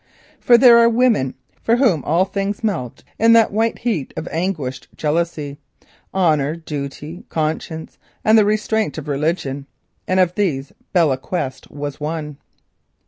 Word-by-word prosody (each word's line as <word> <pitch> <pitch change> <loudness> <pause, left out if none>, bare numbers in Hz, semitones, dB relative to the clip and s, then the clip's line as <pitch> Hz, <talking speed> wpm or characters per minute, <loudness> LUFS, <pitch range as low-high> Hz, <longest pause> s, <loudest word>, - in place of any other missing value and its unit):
For 240 - +6
there 235 -1 +8
are 235 0 +6
women 230 - +2 0.3
with 230 +1 +4
whom 210 - +2
all 170 +5 +2
things 200 +2 -3
melt 165 - -3 0.2
in 230 +1 +6
that 230 -1 +5
white 225 +2 0
heat 220 - -3
of - - -4
anguished 160 -7 -3
jealousy—honour, 150 0 -2
duty, 150 0 -7
conscience, 160 0 -3 0.3
and 220 - +5
the 220 - +6
restraint 215 -3 0
of 150 - -6
religion—and 145 +4 -3
of 180 -1 +3
these 150 -10 -1 0.2
Belle 165 -7 +3
Quest 135 -2 -4
was 145 0 -6
one. 150 -1 -4
165 Hz, 135 wpm, -20 LUFS, 145-210 Hz, 0.3 s, there